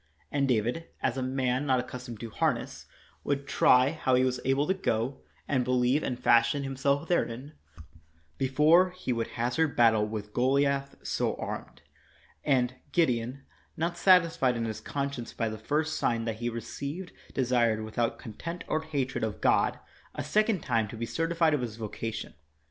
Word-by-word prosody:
And 140 -1 +1
David, 125 +7 0 0.2
as - - +1
a 130 - -2
man 130 +1 0
not 130 -2 +3
accustomed 125 -2 -7
to 115 -2 -6
harness, - - -1 0.4
would 140 -1 -1
try 130 -1 +4
how 130 -5 +1
he 130 - +4
was 130 -1 0
able 135 +2 +2
to 190 - +2
go, 130 - -1 0.3
and 130 -3 +1
believe 125 +3 +2
and 125 -4 -3
fashion 120 +3 +3
himself 140 +3 0
therein, 140 -4 -1 0.9
before 150 +7 +5
he 180 -8 -3
would 115 -1 -2
hazard 125 +7 0
battle 115 -3 +5
with 105 -1 -6
Goliath 140 +2 +1
so - - -1
armed. - - -6 0.6
And 125 -3 +2 0.2
Gideon, 130 -4 0 0.3
not 170 +2 -1
satisfied 170 -9 +4
in 115 - -1
his 110 -1 -4
conscience 140 -4 -4
by 115 -1 -1
the 110 0 -6
first 155 +7 -1
sign 115 -1 0
that 115 -2 -3
he 120 +1 -2
received, 140 - -6 0.2
desired, 120 -4 +2
without 115 +2 -1
contempt 165 - -7
cr 155 - 0
hatred 140 -7 -2
of 110 -2 -2
God, - - +3 0.4
a - - -3
second 210 - +2
time 115 -6 0
to 115 - -9
be 115 - -2
certified 165 +3 +1
of 145 - +1
his 115 -3 -5
voca 115 0 -4
tion. 110 - -7
130 Hz, 165 wpm, -29 LUFS, 115-145 Hz, 0.9 s, before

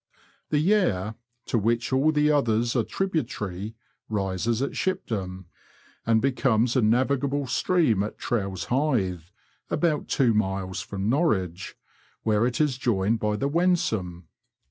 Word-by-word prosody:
The 150 - +1
Yare, 150 - +2 0.3
to 115 - 0
which 115 +4 0
all 140 +4 +4
the 150 0 +3
others 115 -4 +1
are 120 - +3
tributary, 110 - -3 0.3
rises 105 +2 -1
at 140 - -2
Shipdham, 95 - -3 0.6
and 115 -1 +4
becomes 125 -3 +2
a 130 - +4
navigable 135 +5 +1
stream 130 - +2
at 105 - -4
Trowse 95 -6 -2
Hythe, 115 - 0 0.4
about 160 -4 0
two 125 -5 +2
miles 95 -2 -1
from 100 0 -4
Norwich, 100 - 0 0.5
where 110 +1 +2
it 125 - -3
is 145 -4 +1
joined 110 -2 +1
by 105 -1 0
the 135 +6 -1
Wensum. 140 - 0
115 Hz, 130 wpm, -26 LUFS, 100-140 Hz, 0.6 s, all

